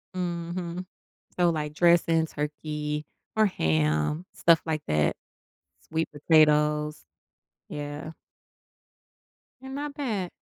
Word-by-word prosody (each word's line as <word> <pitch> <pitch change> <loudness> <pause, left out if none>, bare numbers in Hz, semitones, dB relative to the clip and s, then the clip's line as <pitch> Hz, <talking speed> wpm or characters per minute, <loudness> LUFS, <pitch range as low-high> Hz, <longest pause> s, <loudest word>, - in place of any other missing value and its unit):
Mhm. 175 0 -3 0.5
So, 175 -1 +4
like, 150 -2 -2
dressing, 165 -1 +4
turkey 150 0 -4 0.3
or 220 - +5
ham, 80 - +1
stuff 165 -1 +4
like 155 -2 -2
that 75 -1 +2 0.7
sweet 160 0 -2
potatoes. 150 0 +3 0.6
Yeah. 145 +1 -5 1.5
They're 265 - -8
not 285 +1 -4
bad. 215 -11 -2
160 Hz, 90 wpm, -27 LUFS, 150-175 Hz, 1.5 s, or